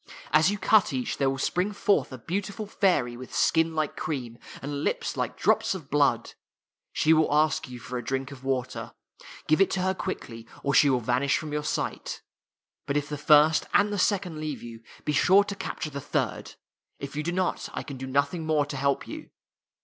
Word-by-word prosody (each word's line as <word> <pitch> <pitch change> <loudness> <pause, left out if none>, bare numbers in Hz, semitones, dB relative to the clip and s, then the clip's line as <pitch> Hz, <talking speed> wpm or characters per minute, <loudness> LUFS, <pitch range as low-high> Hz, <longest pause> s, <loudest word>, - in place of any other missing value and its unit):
As 155 +5 +5
you 205 - -1
cut 210 -2 +4
each, 130 -2 -2
there 135 -1 +2
will 135 - -2
spring 180 +9 0
forth 200 -8 +1
a 130 - -6
beautiful 200 - -4
fairy, 180 -12 +1
with 125 +1 -9
skin 160 0 +2
like 155 -1 -1
cream, 125 -6 -4 0.2
and 140 +1 -4
lips 485 -1 -1
like - - -3
drops - - +2
of 155 -7 -9
blood. 145 -1 +2 0.6
She 160 - +3
will 160 -2 +3
ask 150 -2 +2
you 125 - -8
for 125 +1 -5
a - - -7
drink 135 +1 -3
of 135 -2 -11
water. 130 -2 -3 0.5
Give 155 +4 +3
it 195 - +5
to 190 - -1
her 190 +1 +1
quickly, 115 -12 -6 0.2
or 140 - 0
she 145 - +6
will 130 -2 +2
vanish 125 +4 +1
from 150 -1 -6
your 150 0 -1
sight. - - -3 0.6
But 140 - 0
if 145 0 -2
the 150 - -3
first 150 +2 +5
and 205 0 +4
the 205 - -1
second 180 -5 0
leave 155 -2 -4
you, 115 -1 -9 0.2
be 150 - 0
sure 190 +8 +5
to 200 - -5
capture 185 -5 -5
the 140 0 -5
third. - - -2 0.4
If 140 0 -7
you 150 - -1
do 170 +3 -2
not, 185 +1 -1
I - - -5
can 140 -3 -8
do 130 +1 -6
nothing 140 +5 0
more 155 -2 +2
to 145 -1 -6
help 140 +1 0
you. - - -8
150 Hz, 210 wpm, -27 LUFS, 135-180 Hz, 0.6 s, she